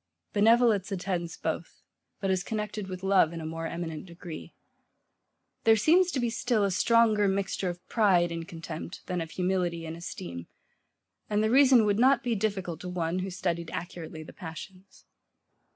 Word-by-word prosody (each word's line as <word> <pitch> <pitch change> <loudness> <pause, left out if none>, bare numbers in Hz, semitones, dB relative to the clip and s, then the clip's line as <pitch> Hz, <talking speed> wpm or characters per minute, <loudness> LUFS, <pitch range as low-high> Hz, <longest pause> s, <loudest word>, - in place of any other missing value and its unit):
Benevolence 215 -2 +4
attends 180 -3 -3
both; 160 +1 -4 0.4
but 195 -1 0
is 185 0 0
connected 210 -2 -4
with 185 0 -7
love 190 -4 +4
in 165 - -5
a 160 - -6
more 165 +1 -4
eminent 165 0 -5
degree. 170 -1 -9 1.1
There 225 0 +6
seems 340 - +4
to 285 - -1
be 240 -2 0
still 235 -2 +1
a 200 - +1
stronger 220 +1 +4
mixture 195 -1 -1
of 175 0 -8
pride 185 -6 +3
in 165 0 -4
contempt 165 +1 -8
than 180 -2 -2
of 165 - -5
humility 180 -2 -1
in 160 0 -5
esteem; 85 - -7 0.8
and 210 0 +2
the 220 - +2
reason 260 -3 +6
would 205 0 +2
not 260 0 +5
be 240 - 0
difficulty 195 -5 -2
to 180 - -5
one, 175 0 -1
who 190 +1 -3
studied 170 -2 -2
accurately 165 -2 -6
the - - -12
passions. 185 +2 -10
185 Hz, 170 wpm, -28 LUFS, 170-215 Hz, 1.1 s, There